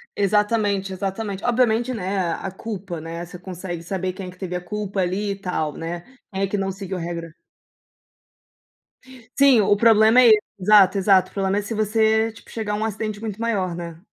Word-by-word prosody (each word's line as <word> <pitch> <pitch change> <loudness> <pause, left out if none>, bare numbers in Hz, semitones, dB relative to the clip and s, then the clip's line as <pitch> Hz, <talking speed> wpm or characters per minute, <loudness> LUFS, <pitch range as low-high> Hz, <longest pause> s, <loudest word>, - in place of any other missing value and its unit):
Exatamente, 205 -1 +1
exatamente 195 +1 -4
obviamente, 245 0 +2
né, 195 -2 -2
a 170 -3 0
a - - -5
culpa, 190 -4 -6
né, 165 +2 -6
você 180 +1 -10
consegue 180 -1 -6
saber 185 +1 -3
quem 190 0 -7
é 180 - -7
que 180 - -18
teve 180 -2 -5
a 180 - -3
culpa 200 0 -3
ali 195 +3 -1
e - - -2
tal, 180 -6 -3
né, 170 +1 -5 0.3
quem 190 0 -3
é - - +1
que 205 - -2
não 195 -1 -1
seguiu 190 -1 -6
a - - -4
regra. 170 -1 -5 2.0
Sim, 275 -5 +6
o 205 +1 +3
problema 220 +2 +5
é 245 - +7
esse, 215 -2 +7 0.2
exato, 200 0 +6
exato. 190 -1 +4
O - - -25
problema 195 0 0
é 205 - +1
se 215 +3 -5
você, 220 +1 +2
tipo, 225 - -16
chegar 215 -2 -3
a - - +1
um 220 +1 -1
acidente 215 -1 -4
muito 220 0 -6
maior, 195 -6 0
né? 170 -1 -7
195 Hz, 205 wpm, -22 LUFS, 180-215 Hz, 2.0 s, é